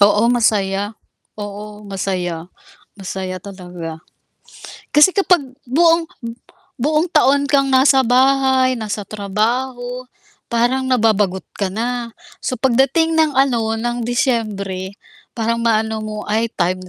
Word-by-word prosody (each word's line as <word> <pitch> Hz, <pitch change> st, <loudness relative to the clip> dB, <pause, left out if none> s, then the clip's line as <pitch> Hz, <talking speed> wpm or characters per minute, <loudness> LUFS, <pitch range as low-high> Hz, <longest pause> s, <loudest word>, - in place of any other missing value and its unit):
Oo, 205 Hz, +2 st, +5 dB
masaya. 205 Hz, -3 st, +1 dB, 0.4 s
Oo, 210 Hz, 0 st, -8 dB
masaya. 180 Hz, -4 st, -3 dB, 0.5 s
Masaya 185 Hz, -1 st, -5 dB
talaga 180 Hz, -4 st, -8 dB, 0.9 s
kasi 300 Hz, +5 st, +5 dB
kapag 375 Hz, -3 st, +4 dB, 0.2 s
buong 330 Hz, +6 st, +3 dB, 0.7 s
buong 305 Hz, +6 st, +1 dB
taon 280 Hz, +2 st, +4 dB
kang 275 Hz, -1 st, +2 dB
nasa 265 Hz, 0 st, +5 dB
bahay, 260 Hz, +1 st, +3 dB
nasa 215 Hz, -3 st, -4 dB
trabaho 245 Hz, +5 st, -2 dB, 0.5 s
parang 240 Hz, +2 st, +1 dB
nababagot 215 Hz, -7 st, +1 dB
ka 195 Hz, -2 st, -2 dB
na, 235 Hz, +3 st, -3 dB, 0.3 s
so -, -, -1 dB
pagdating 270 Hz, +6 st, +2 dB
ng 315 Hz, -3 st, +2 dB
ano, 235 Hz, -5 st, +2 dB
ng 240 Hz, +1 st, -2 dB
Disyembre 215 Hz, -6 st, -2 dB, 0.4 s
parang 230 Hz, 0 st, -1 dB
maano 220 Hz, -1 st, +1 dB
mo 215 Hz, 0 st, -5 dB
ay 220 Hz, +2 st, 0 dB
time 185 Hz, -1 st, -1 dB
230 Hz, 110 wpm, -19 LUFS, 200-260 Hz, 0.9 s, Oo